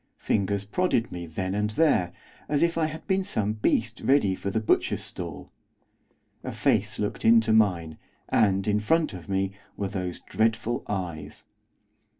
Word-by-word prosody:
Fingers 100 -1 0
prodded 125 - 0
me 85 -1 -6
then 95 +4 -3
and 105 +1 0
there, 110 - +2 0.4
as 145 +1 +2
if 170 0 +2
I 160 -1 +1
had 155 +1 -8
been 190 -1 +1
some 110 - 0
beast 110 +1 0
ready 130 -8 +3
for 100 - -4
the 110 - 0
butcher's 110 - +1
stall. 80 -5 -7 0.9
A - - -4
face - - +1
looked - - -3
into 115 -1 +5
mine, 90 -8 +2 0.3
and, 100 -3 +2
in 105 0 +2
front 155 +8 +1
of 90 +1 -10
me, 95 0 0 0.3
were 100 -1 -2
those 90 -3 -4
dreadful 115 +3 0
eyes. 85 -7 -5
105 Hz, 155 wpm, -26 LUFS, 95-120 Hz, 0.9 s, into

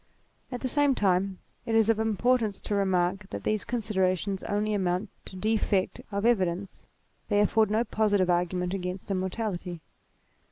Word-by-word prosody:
At 245 - -4
the 260 - -1
same 285 +1 +2
time 190 -2 +1 0.3
it 225 - -1
is 225 -1 +4
of 225 -1 +3
importance 220 -1 +1
to - - -4
remark 190 0 +1
that - - -6
these 215 -1 0
considerations 195 -4 -1
only 210 +1 0
amount 185 0 -1
to - - -10
defect 205 -1 0
of 200 +1 -1
evidence; 190 -4 0 0.4
they 205 -1 +3
afford 215 +1 +3
no 220 +2 +2
positive 205 -5 +1
argument 180 +1 0
against 185 +1 -4
immortality. 185 -2 -3
200 Hz, 150 wpm, -28 LUFS, 185-220 Hz, 0.4 s, is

